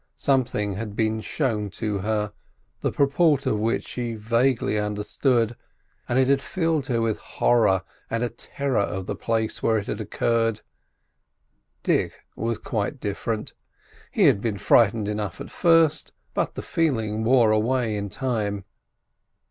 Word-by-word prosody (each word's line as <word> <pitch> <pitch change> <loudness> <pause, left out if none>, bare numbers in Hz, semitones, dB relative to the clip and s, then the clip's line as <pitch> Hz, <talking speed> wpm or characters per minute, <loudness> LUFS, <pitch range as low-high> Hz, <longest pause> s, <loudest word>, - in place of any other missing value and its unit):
Something 110 -7 +1
had 105 -1 -5
been 110 0 0
shown 110 -6 -1
to 105 -3 -1
her, 105 +1 -1 0.5
the - - -1
purport 140 0 +3
of 105 - +1
which 115 +2 0
she 120 -2 -3
vaguely 115 +1 +1
understood, 110 +3 0 0.5
and 120 - +1
it 130 -1 +4
had 135 0 +3
filled 165 -6 -1
her 120 -3 +1
with 115 -2 0
horror 95 -6 +2 0.3
and 115 +1 -1
a 120 - 0
terror 140 -1 -2
of 95 -1 -3
the - - -3
place 110 -1 -1
where 110 -1 +2
it 105 - -3
had 105 - -4
occurred. 115 0 0 1.2
Dick - - 0
was 115 0 -1
quite 110 +5 -3
different. 105 +1 -3 0.6
He - - +1
had 100 - +5
been 110 -3 -1
frightened 110 0 +4
enough 105 -1 -3
at - - -8
first; 165 -3 +3 0.2
but - - -1
the - - -5
feeling 110 -9 0
wore 115 -2 +5
away 115 +1 +1
in 100 -1 -3
time. 105 -6 -2
115 Hz, 150 wpm, -24 LUFS, 105-130 Hz, 1.2 s, had